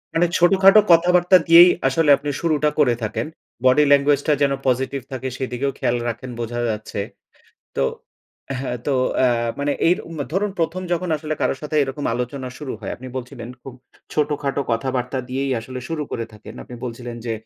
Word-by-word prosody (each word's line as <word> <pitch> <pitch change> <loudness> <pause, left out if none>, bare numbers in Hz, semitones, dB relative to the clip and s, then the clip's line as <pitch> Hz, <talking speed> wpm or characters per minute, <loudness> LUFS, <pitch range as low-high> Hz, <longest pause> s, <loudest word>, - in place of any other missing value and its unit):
মানে 170 - +4
ছোটখাটো 195 +3 +6
কথাবার্তা 180 +2 +5
দিয়েই 170 +2 +9 0.2
আসলে 150 +3 +1
আপনি 145 - -5
শুরুটা 155 -2 +2
করে 125 -5 +4
থাকেন। 110 +7 -2 0.4
বডি 130 +4 +6
ল্যাঙ্গুয়েজ 140 0 +4
টা 150 - +4
যেন 140 -1 +3
পজিটিভ 130 +2 0
থাকে, 130 0 -4
সেদিকেও 130 +1 -2
খেয়াল 120 - 0
রাখেন 120 +2 -6
বোঝা 120 +1 -3
যাচ্ছে। 105 -1 -4 0.8
তো - - +1 0.8
হ্যাঁ, 125 -2 -3
তো 145 - +1 0.3
এ - - +5 0.3
মানে 145 0 0 0.2
এর 180 - +3
উম 165 -2 -8
ধরুন, 200 +2 0
১ম 170 +2 -1
যখন 180 +1 -1
আসলে, 155 +1 -4
কারো 130 - +1
সাথে 150 +1 -3
এরকম 135 +2 -4
আলোচনা 125 +2 -4
শুরু 145 -4 -5
হয়, 100 - -5
আপনি 130 - -10
বলছিলেন 125 -2 -7
খুব 135 -2 -9 0.4
ছোটখাটো 145 -2 -1
কথাবার্তা 125 +2 -1
দিয়েই 135 +2 -2
আসলে 130 +2 -7
শুরু 160 -2 -2
করে 115 - -3
থাকেন। 105 0 -12
আপনি 125 - -11
বলছিলেন 120 0 -6
যে, 115 - -1
140 Hz, 170 wpm, -21 LUFS, 125-155 Hz, 0.8 s, দিয়েই